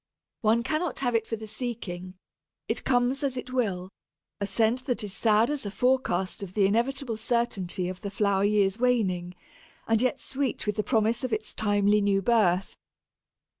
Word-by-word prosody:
One 225 Hz, +1 st, +3 dB
cannot 310 Hz, +1 st, -1 dB
have 245 Hz, -3 st, +1 dB
it 225 Hz, -1 st, +1 dB
for 225 Hz, -, -2 dB
the 220 Hz, 0 st, -8 dB
seeking; 210 Hz, -6 st, -5 dB, 0.5 s
it -, -, -1 dB
comes 250 Hz, +1 st, +1 dB
as 270 Hz, -3 st, -1 dB
it 250 Hz, 0 st, -6 dB
will 195 Hz, -7 st, -1 dB, 0.5 s
a 200 Hz, -, -2 dB
scent 230 Hz, +5 st, +1 dB
that 245 Hz, -3 st, 0 dB
is 205 Hz, -2 st, -5 dB
sad 220 Hz, +3 st, +3 dB
as 295 Hz, -2 st, -3 dB
a 205 Hz, -, -3 dB
forecast 215 Hz, -6 st, 0 dB
of 190 Hz, -2 st, -7 dB
the 205 Hz, -2 st, +4 dB
inevitable 235 Hz, +3 st, 0 dB
certainty 210 Hz, -6 st, -1 dB
of 185 Hz, 0 st, -6 dB
the 200 Hz, -, -4 dB
flower 200 Hz, -1 st, +1 dB
year's 205 Hz, 0 st, +2 dB
waning, 190 Hz, -8 st, +1 dB, 0.5 s
and 225 Hz, 0 st, +3 dB
yet 255 Hz, +2 st, +1 dB
sweet 270 Hz, -2 st, -3 dB
with 210 Hz, 0 st, -1 dB
the -, -, +2 dB
promise 225 Hz, +1 st, +1 dB
of 255 Hz, -, -2 dB
its 215 Hz, 0 st, -2 dB
timely 205 Hz, 0 st, +2 dB
new 200 Hz, -1 st, +2 dB
birth. 195 Hz, -4 st, +2 dB
220 Hz, 175 wpm, -27 LUFS, 200-245 Hz, 0.5 s, the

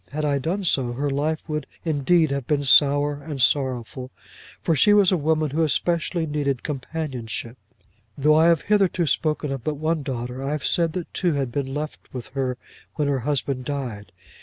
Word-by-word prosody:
Had 150 Hz, +1 st, -3 dB
I 140 Hz, -1 st, +1 dB
done 180 Hz, +8 st, -2 dB
so, 130 Hz, -8 st, +1 dB
her 140 Hz, +3 st, -1 dB
life 150 Hz, +4 st, -1 dB
would 150 Hz, -1 st, -3 dB, 0.2 s
indeed 160 Hz, +1 st, +2 dB
have 140 Hz, -3 st, -3 dB
been 145 Hz, -2 st, +1 dB
sour, 145 Hz, +2 st, +4 dB
and 145 Hz, -1 st, -6 dB
sorrowful, 130 Hz, -1 st, 0 dB, 0.5 s
for 165 Hz, -, +1 dB
she 205 Hz, +7 st, +5 dB
was 200 Hz, -2 st, +5 dB
a -, -, +4 dB
woman 155 Hz, -2 st, +1 dB
who 160 Hz, +3 st, 0 dB
especially 165 Hz, +2 st, 0 dB
needed 145 Hz, -4 st, -1 dB
companionship. 130 Hz, -5 st, -4 dB, 0.6 s
Though 150 Hz, +2 st, +4 dB
I 160 Hz, +2 st, +5 dB
have 170 Hz, -3 st, +3 dB
hitherto 195 Hz, -4 st, +2 dB
spoken 150 Hz, -1 st, 0 dB
but 155 Hz, -, 0 dB
of 145 Hz, -, -10 dB
one 160 Hz, 0 st, 0 dB
daughter, 125 Hz, -2 st, -4 dB
I 140 Hz, +2 st, -1 dB
have 150 Hz, -4 st, -3 dB
said 165 Hz, +1 st, +2 dB
that 180 Hz, -1 st, -5 dB
two 175 Hz, -3 st, +1 dB
had 135 Hz, -4 st, -1 dB
been 135 Hz, 0 st, -2 dB
left 150 Hz, +2 st, -6 dB
with 125 Hz, -2 st, -7 dB
her 130 Hz, -2 st, -2 dB, 0.4 s
when 150 Hz, -2 st, 0 dB
her 140 Hz, -2 st, +1 dB
husband 135 Hz, 0 st, -2 dB
died. 125 Hz, -8 st, -5 dB
145 Hz, 185 wpm, -23 LUFS, 135-160 Hz, 0.6 s, she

